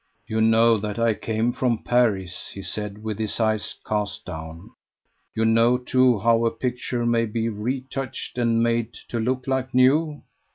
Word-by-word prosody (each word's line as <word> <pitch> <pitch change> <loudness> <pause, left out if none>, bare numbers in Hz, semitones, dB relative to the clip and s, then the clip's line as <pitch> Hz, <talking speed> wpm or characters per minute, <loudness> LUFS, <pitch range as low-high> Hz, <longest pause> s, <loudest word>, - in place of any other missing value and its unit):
"You 110 0 -1
know 115 +1 +5
that 105 +1 -4
I 115 -1 +3
came 110 +2 -1
from 120 -3 -1
Paris," 100 -7 0
he 100 - -7
said, 105 +1 -5
with 110 -1 -4
his 110 0 -2
eyes 110 -2 0
cast 105 -2 -2
down; 80 +6 -8 0.6
"you 110 0 +1
know, 115 +2 +4
too, 125 -1 +3
how 115 +3 +3
a 115 - +3
picture 120 0 -3
may 115 -1 +2
be 115 +1 -1
retouched 130 +4 -4
and 115 -1 +2
made 115 0 0 0.2
to 115 - -2
look 130 +3 -1
like 130 -1 -2
new." 145 +4 +3
115 Hz, 165 wpm, -24 LUFS, 110-125 Hz, 0.6 s, know